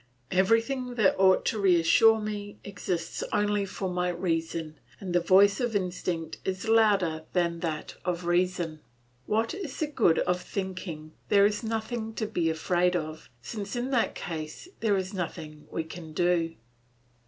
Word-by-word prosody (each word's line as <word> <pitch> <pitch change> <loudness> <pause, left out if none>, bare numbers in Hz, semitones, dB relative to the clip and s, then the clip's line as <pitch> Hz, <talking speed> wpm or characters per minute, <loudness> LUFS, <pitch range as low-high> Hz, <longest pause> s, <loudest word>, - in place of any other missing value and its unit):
Everything 230 +6 +2
that 210 -5 +4
ought 190 -1 +5
to 220 - 0
reassure 195 +4 +5
me 205 -1 -5
exists 180 -3 -3
only 205 -1 +1
for 190 0 -4
my 180 0 0
reason, 165 -2 -2 0.2
and 185 -3 -5
the 175 - +5
voice 195 +3 +5
of 240 -4 -1
instinct 180 -4 -2
is 190 +3 -3
louder 200 -8 +3
than 170 -2 +1
that 160 -3 -3
of 175 -1 -2
reason. 175 -2 0 0.5
What 225 +2 +1
is 365 -8 -6
the 310 - 0
good 235 - +2
of 180 0 +1
thinking 180 -5 -5 0.2
there 200 -1 +6
is 210 0 +1
nothing 225 0 -3
to 220 - -1
be 175 -6 0
afraid 175 +3 +1
of, 155 -2 -4
since 205 -2 -5
in 245 +2 -2
that 245 -4 +1
case 155 - -6
there 210 -3 +2
is 190 +1 -3
nothing 160 -4 -6
we 165 - -2
can 160 0 -9
do? 170 -1 +1
185 Hz, 155 wpm, -28 LUFS, 170-210 Hz, 0.5 s, there